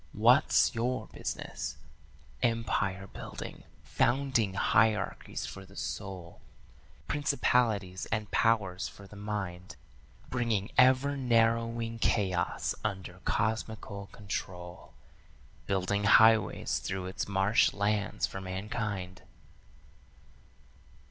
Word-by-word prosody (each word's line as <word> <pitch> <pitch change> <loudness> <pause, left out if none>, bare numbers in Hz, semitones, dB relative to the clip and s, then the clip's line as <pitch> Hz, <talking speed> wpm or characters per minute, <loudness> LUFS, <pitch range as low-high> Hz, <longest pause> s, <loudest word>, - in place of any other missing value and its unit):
'What's - - +5
your 125 +2 -1
business?' 65 - -5 0.6
Empire 110 -5 0
building, - - -8 0.2
founding 120 -6 +1
hierarchies 105 0 +1
for 95 - -8
the 95 0 -16
soul, 95 -5 -6 0.7
Principalities 120 -10 +1
and 105 -2 -2
powers 105 -5 +2
for 100 - -12
the 100 - -13
mind, 100 -4 -5 0.5
Bringing 115 -4 -1
ever 130 +2 +5
narrowing 115 -2 +1
chaos 95 -6 0
under 95 -3 -4
cosmical 110 -2 -2
control, 90 -4 -7 0.7
Building 100 +1 0
highways 110 -1 +5
through 95 -1 -4
its 95 +1 -4
marsh 100 +2 +3
lands 105 0 0
for 95 - -6
mankind. 95 -1 -4
105 Hz, 90 wpm, -30 LUFS, 95-115 Hz, 0.7 s, What's